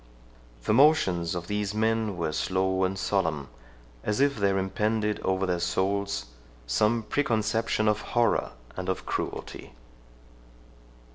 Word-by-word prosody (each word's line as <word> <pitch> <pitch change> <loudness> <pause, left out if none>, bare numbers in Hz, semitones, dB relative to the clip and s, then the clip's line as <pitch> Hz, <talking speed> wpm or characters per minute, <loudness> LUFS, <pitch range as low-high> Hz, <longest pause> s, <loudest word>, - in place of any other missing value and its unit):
The - - +1
motions 105 - +4
of 85 -1 -4
these 105 +1 -2
men 110 -2 +1
were 80 -2 -1
slow 95 +3 +1
and 95 +1 -2
solemn, 80 -8 -1 0.5
as 105 +3 -1
if 140 0 +3
there 100 -2 +1
impended 105 +2 0
over 95 0 0
their 90 -2 0
souls 100 +3 -1 0.4
some 105 - +2
preconception 110 -3 0
of 105 0 +2
horror 120 -1 +1 0.2
and - - -4
of - - -2
cruelty. - - -5
100 Hz, 125 wpm, -27 LUFS, 95-110 Hz, 0.5 s, motions